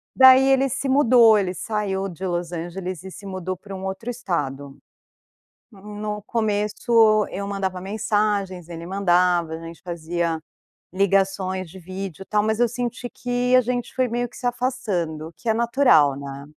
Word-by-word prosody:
Daí 260 0 +8
ele 270 0 +3
se 270 +2 -3
mudou, 245 -5 +6
ele 185 -2 -2
saiu 200 -3 -2
de 180 +1 -9
Los 175 -1 -2
Angeles 175 +1 -5
e 190 - -8
se 200 - -11
mudou 185 -1 -4
para 200 -2 -9
um 190 - -7
outro 195 +6 -4
estado, 145 - -4 0.9
no 210 +1 -6
começo 215 0 +2
eu 200 +1 -4
mandava 190 -2 -3
mensagens, 200 -3 -1
ele 170 0 -7
mandava, 180 -3 +2
a - - -4
gente 165 0 -10
fazia 170 -1 -2 0.5
ligações 190 -1 0
de 190 - -12
vídeo 185 0 -7
e - - -9
tal, 210 0 +1
mas 220 +2 0
eu 240 - +4
senti 245 0 -4
que 245 0 -1
a - - +7
gente 245 0 -3
foi 255 -1 +1
meio 240 +1 -1
que 240 - -15
se 245 - -4
afastando, 185 -11 -2
que 230 - -2
é - - +3
natural, 230 - +4
né. 140 0 -7
195 Hz, 165 wpm, -23 LUFS, 175-230 Hz, 0.9 s, Daí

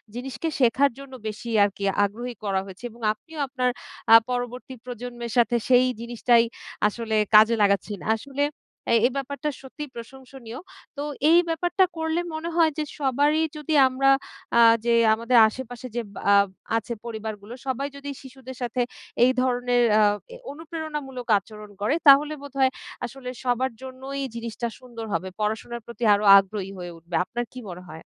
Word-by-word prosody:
জিনিসকে 265 +6 -4
শেখার 265 +3 +4
জন্য 275 -1 -11
বেশি 215 +2 -6
আরকি 200 0 -2 0.2
আগ্রহী 240 +4 -6
করা 195 -2 0
হয়েছে। 190 +3 -12
এবং 235 +2 -17
আপনিও 320 +8 -12
আপনার 255 -1 0 0.4
আ - - +12
পরবর্তী 245 +1 -4
প্রজন্মের 240 -1 -6
সাথে 240 0 +4
সেই 250 0 +6 0.2
জিনিসটাই 235 0 +3 0.4
আসলে 220 0 -3 0.2
কাজে 220 +2 +7
লাগাচ্ছেন। 200 -1 0 0.2
আসলে 280 +4 -3 0.5
এই, 230 - +6
এই - - -5
ব্যাপারটা 280 +2 -3
সত্যিই 280 +2 -8
প্রশংসনীয় 255 0 -10 0.4
তো 285 - -3 0.3
এই 335 +2 +7
ব্যাপারটা 350 +3 +2
করলে 320 +1 -1
মনে 315 +2 -4
হয় 330 -2 +4
যে 310 - 0 0.2
সবারই 290 +3 +2 0.2
যদি 300 +1 -3
আমরা 270 +1 +2 0.5
আ - - +6 0.3
যে 235 - +3 0.2
আমাদের 235 +2 +2
আশেপাশে 245 +2 -7
যে 240 - 0 0.3
আ - - +7 0.4
আছে 230 +1 -4
পরিবারগুলো 220 -1 -6
সবাই 270 +2 -1
যদি 285 0 -7
শিশুদের 260 -1 -11
সাথে 245 +1 -1 0.4
এই 255 - +4
ধরনের 245 -1 +1 0.2
আ - - +5 0.3
এ - - -8 0.2
অনুপ্রেরণামূলক 300 -5 -6
আচরণ 210 +1 -12
করে 240 +9 +1
তাহলে 290 +2 +7
বোধহয় 275 -2 +1 0.3
আসলে 250 0 -8
সবার 255 +1 0
জন্যই 265 +1 -6
জিনিসটা 235 0 -4
সুন্দর 240 -3 -9
হবে। 180 +3 -2
পড়াশোনার 220 +3 -3
প্রতি 235 0 -8
আরো 205 +1 +1
আগ্রহী 195 0 -1
হয়ে 175 -1 -7
উঠবে 170 +1 -7
আপনার 240 +5 -4
কি 255 - -7
মনে 180 +1 -9
হয়? 160 +1 -10
245 Hz, 155 wpm, -25 LUFS, 225-275 Hz, 0.5 s, আ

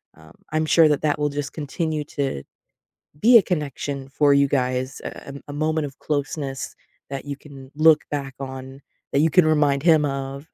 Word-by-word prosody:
um, 80 -1 -17 0.2
I'm 155 0 +1
sure 160 0 +5
that 150 -2 +1
that 150 -1 0
will 150 0 +1
just 145 0 -4
continue 155 +1 -3
to 135 - -3 0.8
be 235 +2 +8
a - - +3
connection 145 -5 -3
for 145 +1 +3
you 140 0 +4
guys, 130 -1 -1
a - - -8
a - - -8
a - - -6
moment 155 +1 0
of 135 -2 -12
closeness 145 -2 -3 0.3
that 135 -1 -5
you 145 -1 -5
can 135 -2 -13
look 155 0 +5
back 140 -2 -4
on, 130 0 -7 0.3
that - - +2
you 160 +2 +3
can 175 +1 +5
remind 145 -3 +2
him 160 -2 +5
of 140 +1 -4
145 Hz, 190 wpm, -23 LUFS, 135-155 Hz, 0.8 s, be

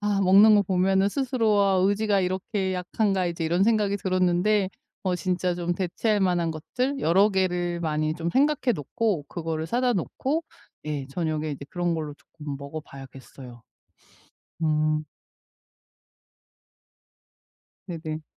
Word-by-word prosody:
아 205 -1 0
먹는 200 +3 +7
거 205 - +5
보면은 190 +1 +2
스스로 230 -4 +1
'아 195 -1 +3
의지가 205 0 +2
이렇게 190 +1 -2
약한가?' 185 +1 0
이제 170 -1 -3
이런 175 +4 +2
생각이 210 -3 +2
들었는데 185 +2 +1 0.3
어 185 -2 0
진짜 180 +1 -1
좀 175 0 -2
대체할 200 +4 0
만한 175 -3 +1
것들 255 - -3
여러 195 +6 +4
개를 175 -3 0
많이 155 -1 -1
좀 170 +1 -3
생각해 275 - +2
놓고 185 - -2
그거를 160 -2 -3
사다 245 +4 +1
놓고 275 - -2 0.4
예 145 -3 -3
저녁에 155 0 -2
이제 140 -1 -6
그런 175 -1 -1
걸로 155 -2 -4
쪼끔 145 -1 -9
먹어봐야겠어요. 135 -4 -10 1.0
음. 155 0 +1 2.8
네네. 160 -2 -5
180 Hz, 270 characters per minute, -25 LUFS, 155-205 Hz, 2.8 s, 먹는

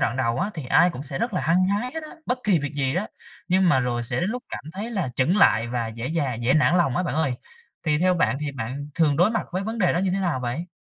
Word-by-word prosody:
đoạn 115 - 0
đầu 120 -2 0
á 200 +3 -1
thì 155 -6 -6
ai 175 +7 +5
cũng 135 -5 -7
sẽ 140 -1 -3
rất 235 0 -1
là 180 - +1
hăng 175 +4 +3
hái 205 +6 0
hết 320 - -4
á, 310 - -9 0.2
bất 250 +1 0
kỳ 200 -5 +4
việc 145 -1 -4
gì 135 -1 0
đó, 190 +5 -1 0.4
nhưng 185 0 +3
mà 130 -5 +4
rồi 120 -1 -1
sẽ 120 +3 -2
đến 185 +5 0
lúc 250 +1 -4
cảm - - -6
thấy 205 +6 -5
là 190 - -1
chững 150 +10 +2
lại 120 - +4
và 120 -2 -2
dễ 115 +4 -5
dà 140 -6 0
dễ 120 +3 +1
nản 155 +3 +4
lòng 170 -8 +2
á - - +1
bạn 175 - -2
ơi. 150 -4 +1 0.5
Thì 150 -3 +1
theo 180 +2 +3
bạn 150 -6 +1
thì 150 -1 -3
bạn 135 +3 -5
thường 150 -4 +2
đối 175 +7 +4
mặt 225 - -2
với 185 +2 -1
vấn 225 +3 -4
đề 185 -5 +3
đó - - 0
như 190 +1 +1
thế 195 - 0
nào 170 -8 0
vậy? 125 +8 -3
160 Hz, 300 wpm, -24 LUFS, 130-185 Hz, 0.5 s, ai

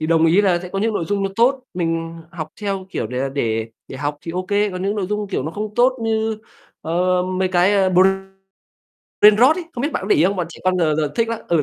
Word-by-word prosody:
Thì 155 - -1
đồng 165 0 +3
ý 175 +5 +5
là 180 -3 +3
sẽ 180 - -7
có 195 +2 -4
những 220 +1 0
nội 170 - -1
dung 200 +2 -1
nó 195 - -1
tốt, 255 +2 +2
mình 165 -1 -2
học 155 -2 -6
theo, 195 -2 -3
kiểu, - - -3
để 125 +2 -5
là 135 +1 -1
để 115 -5 -2 0.2
để - - -7
học 145 +1 -3
thì 165 - -7
ô 185 +1 -2
kê, 205 0 +1
còn 185 0 -5
những 200 +2 0
nội 190 -3 -1
dung 210 0 -3
kiểu 185 - -2
nó 155 - -4
không 210 +3 -5
tốt 250 +2 +4
như, 220 -1 -1 0.4
ờ, 180 +2 +1
mấy 185 0 -1
cái, 185 +3 +3
ờ, 190 -2 +3 1.3
Brainrot 230 - +6
ấy, 360 - -4
không 240 - -5
biết 290 +2 -1
bạn - - -2
có 195 - -5
để - - +4
ý 155 - +4
không? 195 +2 +1
Bọn 175 -2 -1
trẻ - - -12
con 185 0 +2
giờ 155 -3 +2
giờ 150 -2 -1
thích 230 -1 +1
lắm. 230 - -3
Ừ, 165 -3 +2
185 Hz, 275 wpm, -20 LUFS, 165-210 Hz, 1.3 s, Brainrot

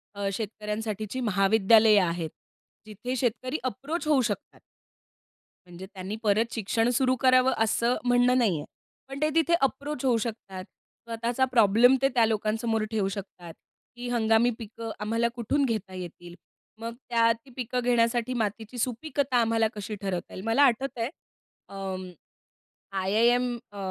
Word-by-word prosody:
अ, 200 0 -2
शेतकऱ्यांसाठीची 215 +2 -4
महाविद्यालयं 215 -1 +4
आहेत, 170 -1 -3 0.6
जिथे 215 +4 -5
शेतकरी 255 +3 -1
अप्रोच 285 +7 -3
होऊ 295 -4 +4
शकतात. 215 -4 -4 1.1
म्हणजे 175 +1 -10
त्यांनी 190 +2 -5
परत 220 +2 +2
शिक्षण 225 +2 0
सुरू 255 +1 +2
करावं, 255 0 +5
असं 230 +2 +2
म्हणणं 245 +1 +4
नाही 215 -9 +2
आहे, - - -7 0.4
पण 270 +1 -7
ते 305 - +3
तिथे 330 +1 +3
अप्रोच 275 +1 -1
होऊ 245 -3 +3
शकतात. 210 -5 -5 0.4
स्वतःचा 235 +3 0
प्रॉब्लेम 230 +2 +5
ते 270 - +3
त्या 235 -2 +5
लोकांसमोर 220 +1 0
ठेवू 210 -3 0
शकतात, 190 -4 -8 0.4
की 245 0 -6
हंगामी 225 0 +3
पिकं 225 0 -7
आम्हाला 230 +2 0
कुठून 260 +4 0
घेता 215 -6 -3
येतील? 175 -1 -9 0.4
मग 230 +1 -5 0.2
त्या 230 -1 +4
ती 230 +4 -18
पिकं 250 0 -2
घेण्यासाठी 240 0 +2
मातीची 220 0 -3
सुपीकता 255 +2 -1
आम्हाला 225 -1 +2
कशी 210 +1 -5
ठरवता 185 -3 -4
येईल? 185 - -7
मला 225 +6 +4
आठवतंय, 250 -2 +1 0.6
अ, - - -11 1.2
आयआयएम 235 +6 +2 0.2
अ, 205 - -12
230 Hz, 140 wpm, -27 LUFS, 210-250 Hz, 1.2 s, करावं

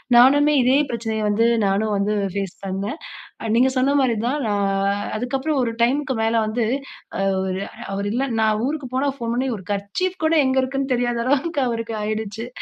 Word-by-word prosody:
நானுமே 290 +5 +6
இதே 255 +2 +4
பிரச்சனைய 225 -2 -2
வந்து 225 +3 +3 0.2
நானும் 205 +2 +1
வந்து 205 +2 0 0.2
ஃபேஸ் 195 -2 -3
பண்ணேன். 195 - -3 0.4
அ 225 - -2
நீங்க 260 +2 +4
சொன்னமாரி 265 -2 +3
தான் 285 +4 0
நான் 200 0 0
அதுக்கப்புறம் 265 +5 -1
ஒரு 230 -1 -1
டைமுக்கு 270 +2 +1
மேல 225 +1 +1
வந்து 225 +1 0 0.5
அ - - 0 0.2
ஒரு 190 +1 -2 0.3
அவரு 200 +1 -2
இல்ல 255 +3 0 0.2
நான் 215 0 +2
ஊருக்கு 290 -3 -4
போனா 275 +2 +1
ஃபோன் 230 -1 -2
பண்ணி 260 +1 0
ஒரு 190 - -12
கர்ச்சீப் 350 - -3
கூட 315 - +3
எங்க 260 - +1
இருக்குன்னு 270 0 -1
தெரியாத 240 -1 0
அளவுக்கு 285 +3 +1
அவருக்கு 230 -1 -3
ஆயிடுச்சு 215 +2 -3
235 Hz, 170 wpm, -22 LUFS, 210-270 Hz, 0.5 s, நானுமே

